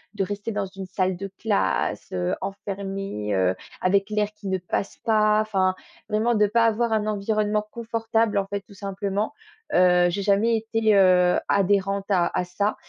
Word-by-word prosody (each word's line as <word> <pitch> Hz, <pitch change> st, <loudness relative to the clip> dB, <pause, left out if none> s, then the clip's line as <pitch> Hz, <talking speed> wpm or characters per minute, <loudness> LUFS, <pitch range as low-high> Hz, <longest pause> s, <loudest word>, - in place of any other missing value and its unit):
de 195 Hz, -, 0 dB
rester 205 Hz, +3 st, -4 dB
dans 205 Hz, -1 st, -2 dB
une 190 Hz, 0 st, -8 dB
salle 185 Hz, -1 st, 0 dB
de 195 Hz, +1 st, -6 dB
classe, 200 Hz, -, 0 dB
heu, 90 Hz, -1 st, -1 dB
enfermée, 195 Hz, -, -4 dB
heu, 95 Hz, 0 st, +2 dB, 0.3 s
avec 195 Hz, +2 st, +2 dB
l'air 210 Hz, -1 st, 0 dB
qui 210 Hz, -1 st, -10 dB
ne 190 Hz, 0 st, 0 dB
passe 185 Hz, +2 st, -3 dB
pas, 215 Hz, -1 st, +3 dB
enfin 190 Hz, -3 st, +1 dB, 0.3 s
vraiment 220 Hz, +3 st, +1 dB
de 210 Hz, 0 st, +4 dB
pas 230 Hz, +2 st, +3 dB
avoir 225 Hz, 0 st, +1 dB
un 215 Hz, -1 st, +1 dB
environnement 210 Hz, 0 st, 0 dB
confortable, 225 Hz, -2 st, -1 dB
en 195 Hz, -, -1 dB
fait, 200 Hz, 0 st, -3 dB
tout 200 Hz, -, -18 dB
simplement. 200 Hz, +3 st, -3 dB, 0.4 s
Heu, 180 Hz, -1 st, +5 dB
j'ai 200 Hz, +3 st, -2 dB
jamais 210 Hz, +4 st, +3 dB
été, 220 Hz, -1 st, +1 dB
heu, 180 Hz, -2 st, +5 dB
adhérente 195 Hz, 0 st, +1 dB
à 175 Hz, -3 st, +2 dB
à -, -, +1 dB
ça 200 Hz, +4 st, -1 dB
200 Hz, 170 wpm, -24 LUFS, 190-215 Hz, 0.4 s, Heu